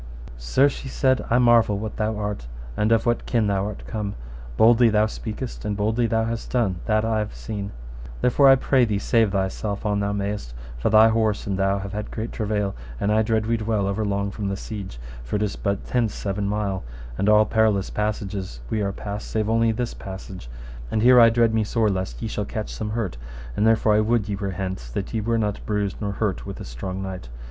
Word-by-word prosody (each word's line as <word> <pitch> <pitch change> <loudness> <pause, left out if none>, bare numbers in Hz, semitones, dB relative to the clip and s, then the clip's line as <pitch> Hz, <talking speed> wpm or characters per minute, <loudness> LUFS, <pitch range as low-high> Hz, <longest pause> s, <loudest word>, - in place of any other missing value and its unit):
Sir, - - +3
she 140 -1 -5
said, 130 0 +2
I 120 - +4
marvel 120 -4 +4
what 110 +1 -5
thou 110 0 -1
art 105 - -4 0.3
and 105 +7 +1
of 115 -1 +3
what 120 0 0
kin 115 -3 +2
thou 100 -1 0
art 105 - -7
come; 105 -3 -4 0.4
boldly 115 +1 +6
thou 105 0 +3
speakest, 110 +3 -6
and 105 -1 -2
boldly 110 +3 +1
thou 115 -1 +1
hast 115 0 -4
done, 110 -8 +1
that 110 -1 +2
have 110 -2 0
I - - -13
seen; 100 -3 -5 0.5
therefore 135 +3 +5
I 135 - +9
pray 130 0 +3
thee 110 -4 +1
save 110 +1 +2
thyself 100 +2 -2
an 105 -1 +1
thou 100 0 0
mayest, 100 -12 -3 0.2
for - - +1
thy 110 +1 +7
horse 110 -2 +1
and 100 - -1
thou 95 +1 +1
have 100 0 -6
had 105 0 -4
great 115 +1 -4
travail, 105 -2 -1 0.3
and 100 - +1
I 110 +1 +4
dread 110 -1 +1
we 115 +1 +1
dwell 110 -2 0
over 100 +2 -1
long 100 -1 -1
from 100 0 -4
the 100 - -2
siege, 100 - -7 0.3
for - - -4
it 105 - +1
is 105 - -2
but 100 0 -1
hence 115 -4 +1
seven 100 0 -2
mile, 100 -2 -1 0.3
and 100 +11 +1
all 105 0 +6
perilous 110 -3 +2
passages 100 - -3
we 110 - 0
are 100 -1 0
passed 105 +1 -6
save 110 -1 -1
all - - +2
only 115 0 +3
this 120 +2 -3
passage; 95 -7 -8 0.4
and 110 - 0
here 125 0 +8
I 115 -1 +8
dread 115 -1 +3
me 110 -1 +2
sore 110 +1 +1
lest 95 -11 -4
ye - - -1
shall - - -3
catch - - -5
some 105 - -4
hurt, 105 - -3 0.4
therefore 110 0 +3
I 105 - +4
would 110 -1 +1
ye 100 - -2
were 100 0 -3
hence, 95 -9 -4
that 95 - -4
ye 110 - 0
were 115 +2 0
not 105 -2 -1
bruised 105 -2 -1
nor 100 -1 -2
hurt 105 -2 -1
with 100 - -6
this - - -8
strong 95 +11 -5
knight. 95 -10 -6
105 Hz, 225 wpm, -24 LUFS, 100-110 Hz, 0.5 s, I